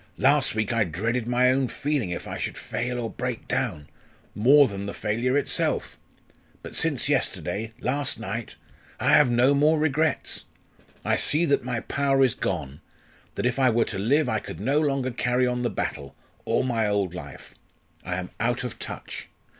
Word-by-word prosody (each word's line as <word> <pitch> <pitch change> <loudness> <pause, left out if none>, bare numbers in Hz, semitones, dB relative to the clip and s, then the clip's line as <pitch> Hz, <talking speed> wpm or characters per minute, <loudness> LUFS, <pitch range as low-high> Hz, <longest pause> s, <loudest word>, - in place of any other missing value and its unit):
"Last 140 -3 +3
week 110 +1 0
I 115 -2 +3
dreaded 110 +8 -2
my 125 +1 +4
own 130 0 +1
feeling 145 -7 -1
if 90 - -5
I - - -5
should - - -3
fail 125 +1 -3
or 115 - -2
break 125 0 -4
down 75 -1 -2 0.5
more 135 +6 +6
than 100 -2 -5
the 100 - -5
failure 120 +6 0
itself. 145 - -1 0.7
But - - -8
since - - 0
yesterday 110 +2 -1
last 140 0 -1
night 115 +1 -5 0.4
I - - +1
have 150 -4 +6
no 120 +3 +4
more 150 +3 +4
regrets. 155 +1 0 0.6
I - - +2
see 155 +4 +2
that 140 -5 +2
my 120 -2 -2
power 135 -1 +2
is 125 -5 +3
gone 70 +1 -3 0.5
that - - -2
if 125 +1 0
I 130 -1 +5
were 115 0 +2
to - - -4
live 140 +10 +2
I 110 - 0
could 80 - -8
no 135 +9 +2
longer 135 -3 0
carry 125 +1 +1
on 125 0 -1
the 120 - +1
battle 70 -1 -4 0.3
or - - +1
my 115 -4 +1
old 100 -4 0
life. 75 -5 -9 0.5
I 90 - -3
am 90 0 -5
out 120 +3 0
of 115 -3 -6
touch. - - -7
125 Hz, 180 wpm, -25 LUFS, 105-135 Hz, 0.7 s, more